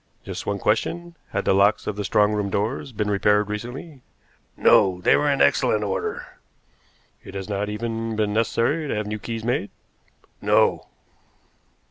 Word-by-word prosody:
Just - - -7
one 100 - 0
question. 170 - -1
Had - - -2
the - - +3
locks 100 +2 +3
of 105 - -3
the 105 - -3
strong 105 +1 +2
room 105 -1 -1
doors 110 +8 -2
been 105 -2 -2
repaired 105 +1 +2
recently?" 125 +7 -7 0.6
"No. 95 -2 +4
They - - +4
were 145 0 +2
in 140 -1 +3
excellent 110 -5 +2
order." 95 -2 -4 0.8
"It 95 - -11
has 95 -1 -5
not 105 0 -2
even 115 +1 -3
been 105 -1 0
necessary 115 +8 0
to - - -2
have 105 0 -2
new 105 +1 -4
keys 115 +1 -5
made?" 120 -3 -1 0.7
"No." - - +2
105 Hz, 160 wpm, -23 LUFS, 105-120 Hz, 0.8 s, No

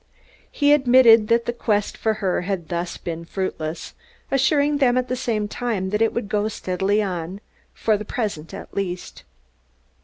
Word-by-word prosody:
He 290 0 +4
admitted 245 -5 +6
that 230 +1 +2
the 240 - -1
quest 210 -3 0
for 220 -1 0
her 190 -5 -1
had 180 -3 -4
thus 170 0 -3
far - - -28
been 170 -1 -4
fruitless, 165 -3 -4 0.4
assuring 285 +2 +2
them 250 -3 +3
at 255 0 -1
the 255 - 0
same 220 -4 -1
time 205 -5 -3
that 210 +1 0
it 225 - +3
would 235 -3 -3
go 210 0 0
steadily 200 0 0
on, 180 0 -4 0.3
for 215 -2 +1
the 210 - -6
present 205 - -4
at - - -9
least. 185 -2 -4
210 Hz, 175 wpm, -22 LUFS, 185-245 Hz, 0.4 s, admitted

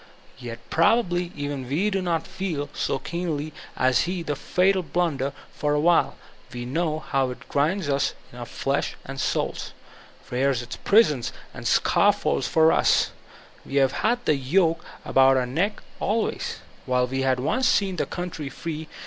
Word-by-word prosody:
Yet 120 -2 -8
probably 175 -1 +2
even 145 -3 -4
we 185 +10 +1
do 195 -1 0
not 170 -2 -1
fed 185 -6 -3
so - - -1
keenly 155 -3 -3 0.2
as 130 0 +3
he 180 -2 -2
the 150 -3 -2
fatal 185 +6 +2
blunder; 150 -4 -1 0.2
for 150 0 0
while 170 +3 +3 0.4
we 120 -1 -5
know 155 +4 -1
how 135 -4 0
it 125 - -9
grinds 160 +5 +1
us 140 0 +1 0.2
in 125 - -10
our 120 - -6
flesh 140 +1 -1
and 135 0 -5
sools, - - -2 0.6
rears 130 0 +1
its 120 - -7
prisons 150 - +3 0.2
and - - -5
scaffolds - - +3
for 160 0 +5
us, - - +3 0.5
we 140 - -7
have 135 -2 +4
had 240 - 0
the 150 - +3
yoke 165 +5 +2 0.2
about 135 0 +5
our 130 - +1
necks 175 - -1 0.2
always, 220 +2 -1
— - - -26
^while 125 0 +2
he 135 0 0
had 130 -1 +2
once 255 - +1
seen 195 -6 +2
the - - -1
country 170 -5 -5
free. 160 +1 -6
150 Hz, 165 wpm, -25 LUFS, 135-180 Hz, 0.6 s, for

